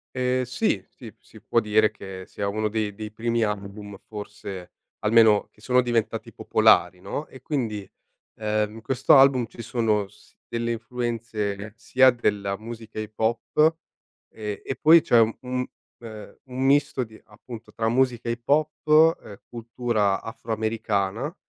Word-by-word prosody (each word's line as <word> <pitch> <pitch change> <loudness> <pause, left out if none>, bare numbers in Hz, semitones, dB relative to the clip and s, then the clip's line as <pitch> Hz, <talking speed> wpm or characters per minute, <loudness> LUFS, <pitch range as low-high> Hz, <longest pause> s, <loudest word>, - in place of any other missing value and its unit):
Ehm, 130 0 +1
sì, 130 - -1
sì, 115 -4 -12
si 110 - -17
può 115 - +1
dire 110 0 +3
che 95 -3 -9
sia 100 - -4
uno 110 +2 -1
dei 105 -1 -2
dei 105 +1 -7
primi 115 +2 -1
album 100 -1 -5
forse 100 -3 -8 0.3
almeno, 110 -1 +4
che - - -27
sono 125 +3 +3
diventati 120 -3 -1
popolari, 90 +1 +3
no, 145 - -4
e 130 - -14
quindi, 110 -9 -3 0.5
ehm, 105 0 -1
in 115 - -10
questo 130 +3 +4
album 135 -3 +5
ci 115 - -10
sono 110 -4 0
s - - -23
delle 115 0 -2
influenze 115 -3 -4
sia 130 +3 +4
della 100 -4 -1
musica 115 -1 -8
hip 110 0 -7
hop 120 +8 +2 0.6
e 105 -2 -6
e 135 - -4
poi 165 +2 +6
c'è 120 - +4
un 115 0 +3
un, 125 0 -2 0.3
uhm, 110 -2 -10
un 130 0 -4
misto 140 -1 +3
di 110 -2 -13
appunto 110 +2 -12
tra 110 -1 0
musica 120 -1 +1
hip 120 0 -5
hop 155 +2 +4
e 100 -2 -13
cultura 115 -4 -1
afroamericana 110 - -2
115 Hz, 150 wpm, -25 LUFS, 105-125 Hz, 0.6 s, poi